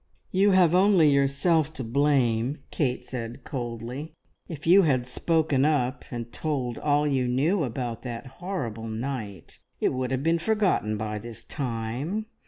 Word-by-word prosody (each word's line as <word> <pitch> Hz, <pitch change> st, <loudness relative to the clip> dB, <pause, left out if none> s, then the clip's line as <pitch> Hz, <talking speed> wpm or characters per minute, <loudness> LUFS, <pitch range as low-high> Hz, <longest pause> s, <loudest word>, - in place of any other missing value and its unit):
"You 195 Hz, +2 st, +4 dB
have 185 Hz, -4 st, +5 dB
only 185 Hz, -5 st, +5 dB
yourself 140 Hz, +3 st, +2 dB
to 130 Hz, -, -5 dB
blame," 130 Hz, 0 st, +1 dB
Kate 125 Hz, -4 st, -1 dB
said 120 Hz, -2 st, -6 dB
coldly. 125 Hz, +2 st, -5 dB, 0.3 s
"If 155 Hz, -3 st, -8 dB
you 185 Hz, +4 st, +7 dB
had 130 Hz, -8 st, +2 dB
spoken 155 Hz, +1 st, +1 dB
up 145 Hz, -3 st, +1 dB
and 120 Hz, -1 st, -6 dB
told 135 Hz, -6 st, -2 dB
all 145 Hz, 0 st, +2 dB
you 135 Hz, -4 st, +1 dB
knew 155 Hz, +9 st, +2 dB
about 120 Hz, -2 st, -4 dB
that 120 Hz, 0 st, -6 dB, 0.2 s
horrible 120 Hz, -, -4 dB
night, 110 Hz, -, -5 dB, 0.2 s
it -, -, +1 dB
would 130 Hz, -1 st, -2 dB
have 130 Hz, 0 st, -1 dB
been 165 Hz, +1 st, +2 dB
forgotten 190 Hz, -, +1 dB
by 105 Hz, 0 st, -3 dB
this 115 Hz, 0 st, -9 dB
time. 130 Hz, -, -3 dB
135 Hz, 150 wpm, -26 LUFS, 120-160 Hz, 0.3 s, you